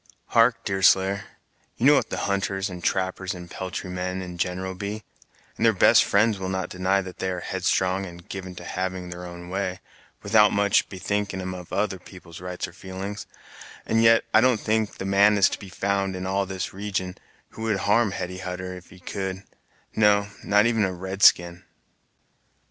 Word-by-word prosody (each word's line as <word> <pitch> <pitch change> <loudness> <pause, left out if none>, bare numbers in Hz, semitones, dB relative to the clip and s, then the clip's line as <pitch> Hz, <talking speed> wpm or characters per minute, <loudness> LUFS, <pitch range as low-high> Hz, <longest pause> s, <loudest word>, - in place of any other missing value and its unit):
"Hark, 115 +1 +3
Deerslayer, 95 0 +3 0.5
you 120 - 0
know 145 - +8
what 145 - +2
the - - -3
hunters, 95 -1 -1
and 90 -1 -8
trappers, 95 0 -1
and 90 -1 -10
peltry 95 0 -5
men 90 +1 -3
in 90 -1 -8
general 95 +1 -2
be; 100 +3 -5 0.5
and - - -2
their - - +5
best - - +6
friends 105 0 +2
will 95 0 -3
not 95 0 -2
deny 95 +2 +1
that 95 -1 -10
they 95 - -1
are 90 -1 -3
headstrong 95 +2 0
and 85 0 -12
given 95 -2 -7
to 90 - -9
having 95 0 -4
their 90 0 -7
own 85 0 -9
way, 95 0 -3 0.4
without 105 0 +5
much 100 -1 +2
bethinking 100 +1 -2
'em 95 0 -4
of 90 -2 -9
other 100 -3 -1
people's 90 -2 -13
rights 90 0 -4
or - - -14
feelin's, 95 +2 -7 0.6
and 115 0 +2
yet 115 0 +5
I 110 - +7
don't 125 -2 +3
think 110 0 -1
the 95 - -5
man 100 +2 +4
is 100 - +5
to - - -5
be 100 - -10
found, 100 0 -1
in 90 0 -5
all 95 +1 0
this 95 -2 -4
region, 95 -2 -3 0.3
who - - -11
would 110 -4 0
harm 105 +2 +3
Hetty 90 -1 -5
Hutter, 90 0 -5
if 90 -1 -11
he 95 - -15
could; 95 +1 -5 0.5
no, 105 -1 +4
not 105 +1 +4
even 115 -2 +2
a 95 - +1
red 95 +2 -6
skin." 85 -3 +5
95 Hz, 190 wpm, -25 LUFS, 90-100 Hz, 0.6 s, know